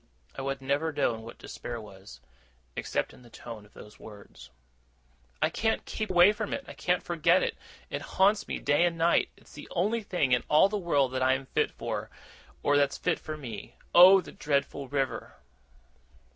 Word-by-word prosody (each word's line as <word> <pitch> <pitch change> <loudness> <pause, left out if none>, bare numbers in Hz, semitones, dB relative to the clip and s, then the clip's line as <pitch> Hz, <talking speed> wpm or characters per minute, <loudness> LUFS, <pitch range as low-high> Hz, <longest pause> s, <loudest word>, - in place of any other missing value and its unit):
I - - -5
have 135 0 -3
never 145 +4 0
known 120 -6 0
what 115 +1 -11
despair 120 -1 -7
was, 95 - -13 0.5
except - - -2
in - - -16
the 120 - -16
tone 110 -2 -10
of - - -29
those 105 0 -13
words. 100 - -13 0.9
'I - - +2
can't 225 0 -1
keep 215 - -4
away 180 +2 +6
from 215 -1 -3
it. 275 - -7
I - - -8
can't 180 0 0
forget 170 +2 +3
it. - - -1 0.4
It - - -3
haunts 200 +2 +2
me - - -3
day 145 +4 +2
and 170 -1 +1
night. 165 +1 +3
It's - - -19
the 145 - -10
only 210 +6 0
thing 175 -10 -1
in 125 - +4
all 155 +6 +6
the 210 - -3
world 145 -9 +1
that 130 0 -2
I 130 0 +4
am 135 +1 -3
fit - - 0
for, - - -5 0.5
or 145 - +3
that's 140 -1 +2
fit - - 0
for 155 0 -6
me. 120 -8 -8 0.2
Oh, 185 +2 +9
the 170 - -11
dreadful 140 -1 -2
river! 135 -1 -3
145 Hz, 190 wpm, -28 LUFS, 125-175 Hz, 0.9 s, Oh